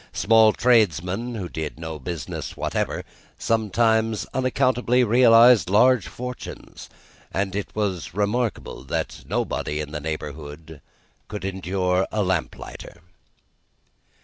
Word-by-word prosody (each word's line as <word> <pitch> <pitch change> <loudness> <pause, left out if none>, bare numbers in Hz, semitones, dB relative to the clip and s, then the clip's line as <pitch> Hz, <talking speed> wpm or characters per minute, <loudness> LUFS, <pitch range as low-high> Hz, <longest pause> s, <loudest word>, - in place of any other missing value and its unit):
Small 110 0 +5
tradesmen, 110 - +1
who 95 -5 -4
did 80 -2 -5
no 80 -1 -6
business 85 -6 -6
whatever, - - -2 0.3
sometimes 110 0 +1
unaccountably 125 -1 +2
realised 115 - +6
large 115 +2 +4
fortunes, 125 0 -8 0.4
and 95 +1 -2
it 105 - -3
was 95 -8 -2
remarkable 105 +3 -1
that - - -4
nobody 75 - -2
in 75 -1 -5
the 75 -1 -5
neighbourhood 75 0 -7 0.5
could 105 -2 -6
endure 95 0 -1
a 105 -1 0
lamplighter. 85 -1 -4
100 Hz, 105 wpm, -23 LUFS, 80-115 Hz, 0.5 s, realised